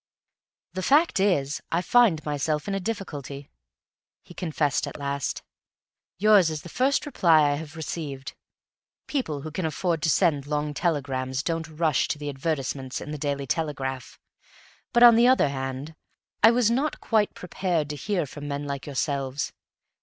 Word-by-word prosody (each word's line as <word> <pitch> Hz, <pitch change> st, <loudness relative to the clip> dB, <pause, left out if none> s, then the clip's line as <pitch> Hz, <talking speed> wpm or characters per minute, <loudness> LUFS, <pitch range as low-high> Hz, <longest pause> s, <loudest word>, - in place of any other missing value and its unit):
"The 185 Hz, -, -3 dB
fact 290 Hz, -, +3 dB
is, 155 Hz, -8 st, +1 dB
I 170 Hz, +2 st, +1 dB
find 200 Hz, -10 st, +4 dB
myself 150 Hz, 0 st, -1 dB
in 200 Hz, -, -1 dB
a 195 Hz, -, 0 dB
difficulty," 145 Hz, -, -6 dB, 0.7 s
he -, -, -14 dB
confessed 155 Hz, -6 st, -1 dB
at -, -, -7 dB
last. 140 Hz, -1 st, -3 dB, 0.7 s
"Yours 200 Hz, -3 st, +5 dB
is 155 Hz, -1 st, -5 dB
the 170 Hz, -, -9 dB
first 265 Hz, +7 st, +1 dB
reply 165 Hz, -, +4 dB
I -, -, +1 dB
have 155 Hz, +2 st, -6 dB
received; 145 Hz, -4 st, -5 dB, 0.7 s
people 160 Hz, -, -2 dB
who 155 Hz, +2 st, -7 dB
can 180 Hz, +4 st, -3 dB
afford 165 Hz, +1 st, -1 dB
to 160 Hz, -, +1 dB
send 150 Hz, -5 st, +2 dB
long 150 Hz, 0 st, -1 dB
telegrams 135 Hz, -5 st, -1 dB
don't 165 Hz, -1 st, -2 dB
rush 160 Hz, -2 st, +1 dB
to -, -, -2 dB
the 145 Hz, 0 st, -5 dB
advertisements 135 Hz, -2 st, -3 dB
in 150 Hz, -, -7 dB
the 150 Hz, -, -5 dB
Daily 140 Hz, -1 st, -2 dB
Telegraph; 135 Hz, -4 st, -3 dB, 0.7 s
but, 240 Hz, -, +5 dB
on 235 Hz, -2 st, +9 dB
the 240 Hz, +1 st, +6 dB
other 255 Hz, -, +4 dB
hand, 135 Hz, +2 st, -5 dB, 0.5 s
I 225 Hz, -, +9 dB
was 235 Hz, -1 st, +3 dB
not 275 Hz, +6 st, 0 dB
quite 215 Hz, -3 st, +1 dB
prepared 180 Hz, -4 st, -2 dB
to -, -, -4 dB
hear 180 Hz, +1 st, -1 dB
from 145 Hz, +1 st, -8 dB
men 145 Hz, 0 st, -3 dB
like 140 Hz, 0 st, -5 dB
yourselves. 140 Hz, -1 st, -2 dB
155 Hz, 160 wpm, -26 LUFS, 140-185 Hz, 0.7 s, on